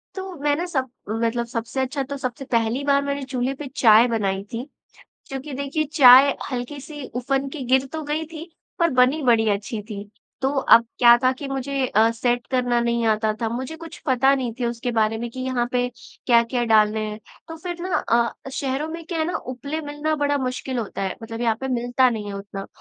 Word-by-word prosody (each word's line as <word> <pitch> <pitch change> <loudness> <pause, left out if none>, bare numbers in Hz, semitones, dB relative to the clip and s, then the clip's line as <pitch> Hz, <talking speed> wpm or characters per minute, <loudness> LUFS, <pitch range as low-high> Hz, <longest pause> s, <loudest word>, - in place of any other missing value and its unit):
तो 380 -1 -6
मैं 290 0 +2
ना 345 - -2
सब, 265 -7 -2 0.2
मतलब 230 +2 -1
सबसे 235 +2 -4
अच्छा 270 +2 -2
तो 280 +1 -6
सबसे 255 0 -5
पहली 230 +3 +1
बार 280 0 +3
मैंने 280 0 -3
चूल्हे 260 0 -2
पे 285 0 -7
चाय 225 0 +6
बनाई 195 -4 -1
थी, 230 +2 -3 0.7
क्योंकि 270 +2 -6
देखिए 280 +3 -1
चाय 265 0 +8 0.2
हल्की-सी 280 +3 -6
उफन 270 +2 -1
के 285 +1 -7
गिर 265 +1 +3
तो 315 - -4
गई 305 +2 -2
थी, 325 +2 -9 0.3
पर 335 -2 +3
बनी 260 +4 +3
बड़ी 230 -3 +3
अच्छी 205 +2 -3
थी। 205 -1 -7 0.4
तो 265 - +1
अब 230 -3 +6
क्या 240 -1 +8
था 255 +1 +3
कि 270 +2 -7
मुझे 270 0 -1
अ, 225 0 +3
सेट 240 +1 -1
करना 245 -2 +1
नहीं 235 0 0
आता 215 0 +2
था 225 - +1
मुझे 255 +7 -5
कुछ 330 0 -10
पता 265 +1 +4
नहीं 255 -4 -2
थी 250 - -1
उसके 235 +1 -3
बारे 220 0 +1
में 235 - -4
कि 260 - -8
यहाँ 255 -2 -1
पे 245 0 +1 0.4
क्या-क्या 240 0 +3
डालने 215 -1 +3
हैं। 210 0 -6 0.3
तो 325 - -7
फिर 345 +1 -6
ना 365 -1 -2
अ, 235 +2 0
शहरों 275 +3 -2
में 330 0 -7
क्या 335 -2 -3
है 315 - +1
ना 350 - -1
उपले 280 +5 -5
मिलना 295 +1 -2
बड़ा 290 0 +1
मुश्किल 255 0 -3
होता 215 -3 -4
है 190 - -2
मतलब 225 0 -6
यहाँ 230 -2 +2
पे 265 - -3
मिलता 245 +1 +2
नहीं 215 -3 -4
है - - -5
उतना। 195 0 -7
255 Hz, 210 wpm, -23 LUFS, 230-280 Hz, 0.7 s, चाय